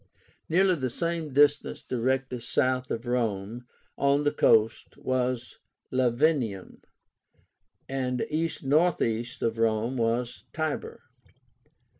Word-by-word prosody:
Nearly 185 +3 +4
the 130 -6 -2
same 165 +2 -3
distance 145 +2 +2
directly 130 +1 -1
south 130 +1 0
of 115 +2 -3
Rome, 120 -1 -2 0.3
on 140 +1 +3
the 145 - +2
coast, 110 +1 +2
was 125 -1 -2 0.3
Lavinium, 125 - 0 1.1
and 130 -2 -1
east 160 +1 -2
northeast 135 -6 +1
of 115 0 -1
Rome 115 +3 +1
was 120 +1 -1
Tibur. 155 -1 -3
130 Hz, 100 wpm, -27 LUFS, 115-145 Hz, 1.1 s, Nearly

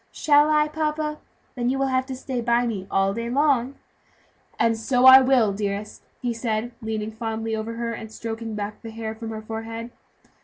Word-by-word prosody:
"Shall 295 0 +4
I, 300 0 +3
papa? 305 0 -2 0.3
then 245 -1 -1
you 265 - 0
will 270 0 +1
have 260 0 +1
to 265 - -4
stay 255 -1 -4
by 235 +1 +2
me 200 -5 -3
all 195 0 +2
day 230 +2 -4
long." 275 -1 +2 0.8
"And 230 0 +2
so 245 +3 +1
I 260 0 +11
will, 250 -6 +3
dearest," 205 +1 -4 0.2
he 240 -1 0
said, 230 0 -2
leaning 220 -1 -3
fondly 225 0 -3
over 220 +1 -4
her, 230 0 -3
and 220 -1 -8
stroking 225 0 -5
back 210 0 -5
the 225 - -8
hair 220 0 -5
from 225 0 -7
her 220 -1 -6
forehead. 225 +1 -6
230 Hz, 190 wpm, -24 LUFS, 220-260 Hz, 0.8 s, I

